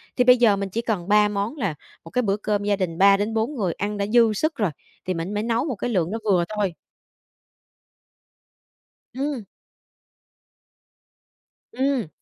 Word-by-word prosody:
thì 250 - +3
bây 250 0 +7
giờ 230 -4 +4
mình 195 0 -3
chỉ 225 +5 -2
cần 205 -7 -2
3 210 0 +5
món 205 +7 -3
là 195 - -2 0.3
một 165 - -11
cái 250 - +1
bữa 200 -4 0
cơm 205 -1 -1
gia 205 0 +2
đình 180 -4 -3
3-4 210 - +3
người 195 -8 -1
ăn 205 +1 -3
đã 200 - 0
dư 230 0 +4
sức 310 +9 -1
rồi, 210 - 0 0.3
thì 185 - -1
mình 170 +4 -4
mới 210 +1 -1
nấu 230 +3 0
một 270 -6 -2
cái 230 - -3
lượng 180 -6 0
đó 225 - -2
vừa 185 -5 +3
thôi. 200 -4 0 2.4
Ừm. 270 -2 -3 2.3
Ừm. 260 -4 0
210 Hz, 165 wpm, -23 LUFS, 195-235 Hz, 2.4 s, bây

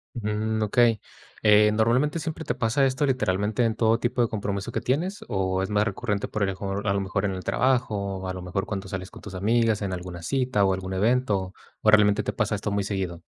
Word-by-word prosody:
Mm, 110 0 -1
okey, 115 0 +3 0.4
eh, 105 0 +6
¿normalmente 120 +9 +2
siempre 160 0 -4
te - - -2
pasa 115 +5 +1
esto 135 +2 +1
literalmente 105 -3 0
en 115 -1 +1
todo 115 0 +2
tipo 120 0 0
de - - +2
compromiso 100 0 -3
que - - -2
tienes 175 +10 -1
o 95 -1 0
es 95 - -2
más 105 0 +2
recurrente 105 0 -2
por 110 - -4
el 100 - +2
mejor 100 +2 -4
a 100 - +3
lo 100 - 0
mejor 95 +1 -2
en 95 - -1
el 95 - -6
trabajo, 110 -6 0
o 95 0 -6
a 95 - -3
lo 90 - -6
mejor 95 +3 -3
cuando 95 -2 -5
sales 95 -1 -6
con - - -12
tus 100 -3 -9
amigas 110 +1 +1
en 95 -2 -2
alguna 90 -1 -7
cita 125 -4 +1
o 95 - +2
algún 95 0 -4
evento, 105 -2 +1 0.3
o 105 - +4
realmente 105 -1 +5
te - - -3
pasa 105 -2 0
esto 105 +1 -3
muy 100 -1 0
seguido? 95 -4 -3
105 Hz, 230 wpm, -25 LUFS, 95-115 Hz, 0.4 s, eh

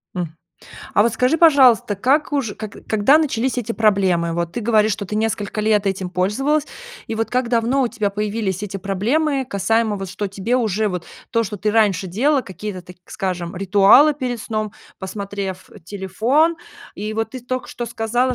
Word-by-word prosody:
М. 165 -3 -4 0.6
А 205 - +5
вот 230 0 +1
скажи, 250 +8 +1
пожалуйста, 260 - +5
как 285 +8 +1
уж 255 -8 -1
как 215 -2 -8
когда 220 +7 +4
начались 260 -4 0
эти 230 -1 -2
проблемы? 190 -7 +2
Вот 170 0 -2
ты 240 - -3
говоришь, 215 -1 +3
что 200 -2 -4
ты 210 - -5
несколько 215 -1 -2
лет 210 -2 +2
этим 190 -2 -2
пользовалась, 270 +12 0 0.4
и 225 - -4
вот 225 0 -2
как 250 -1 0
давно 240 +3 +1
у 245 - +1
тебя 205 -3 -2
появились 205 -2 -2
эти 200 -1 -4
проблемы, 255 - 0
касаемо, 220 +2 +1
вот, 195 -2 -6
что 205 +1 -3
тебе 200 +5 -2
уже 215 -3 0
вот 180 -2 -5 0.2
то, 230 -1 +1
что 210 0 -5
ты 210 +2 -1
раньше 200 -4 +2
делала, 265 - +1
какие-то, 190 0 -7
так 180 0 -14
скажем, 180 -2 -4
ритуалы 200 - +6
перед 250 -5 -4
сном, 215 -2 -3 0.3
посмотрев 195 -1 -5
телефон? 225 - +1 0.4
И 215 +1 -4
вот 225 0 -2
ты 255 - -7
только 255 +1 -4
что 240 - -5
сказала, 240 +3 0
215 Hz, 180 wpm, -20 LUFS, 195-245 Hz, 0.6 s, ритуалы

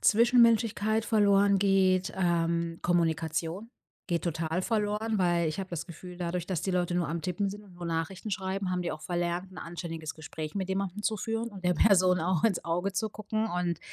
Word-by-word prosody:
Zwischenmenschlichkeit 230 -2 +4
verloren 200 -2 +4
geht. 190 -2 +3
Ähm, 170 -2 0
Kommunikation 165 +3 0 0.4
geht 170 -3 -1
total 165 +1 -1
verloren, 215 +1 0
weil 175 -2 +2
ich 155 +5 -2
hab 190 - -5
das 170 -3 -5
Gefühl, 180 +1 -10
dadurch, 175 -1 -2
dass 180 -4 -2
die 190 - -1
Leute 175 -1 0
nur 175 - +1
am 165 +1 -3
Tippen 185 +4 -1
sind 205 +2 -7
und 190 -3 -17
nur 175 0 -6
Nachrichten 170 +5 -3
schreiben, 190 0 -2
haben 180 - -1
die 175 - -2
auch 155 - -6
verlernt, 175 +2 -2
'n - - -13
anständiges 165 -2 -6
Gespräch 155 +1 -6
mit 190 -1 -2
jemandem 195 +1 -2
zu 220 - +1
führen 225 +3 -2
und 195 -4 -11
der 180 0 +3
Person 185 0 +4
auch 170 0 0
ins 210 -6 +1
Auge 175 +4 -1
zu 215 +3 -1
gucken 215 +1 -2
und, 175 -4 -1
180 Hz, 195 wpm, -29 LUFS, 170-200 Hz, 0.4 s, Zwischenmenschlichkeit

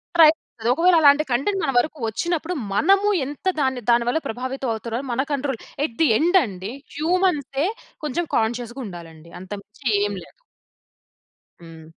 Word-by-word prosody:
Try 330 -2 +9
జేస్తది. 235 -7 -6
ఒకవేళ 345 +4 +4
అలాంటి 290 0 +6
కంటెంట్ 375 +11 0
మన 270 - +1
వరుకు 310 +5 +1
ఒచ్చినప్పుడు, 335 - -2 0.2
మనము 390 - +4 0.2
ఎంత 290 +5 -9
దాని 260 -3 0
దాని 235 0 +4
వల్ల 320 - +1
ప్రభావితవవుతున్నామో 245 0 -3
మన 250 +3 +1
కంట్రోల్. 275 -3 -2 0.3
ఎట్ 230 - -8
ది 320 - +6
ఎండండి, 240 - +1 0.2
హ్యూమన్సే 315 -3 +1 0.4
కొంచెం 335 +5 -1
కాన్షియస్‌గుండాలండి. 220 - -4
అంతకుమించి 205 +7 -8 0.2
ఏం 205 - -2
లేదు. - - -20 1.2
హ్మ్. 165 -1 -12
265 Hz, 130 wpm, -22 LUFS, 225-320 Hz, 1.2 s, Try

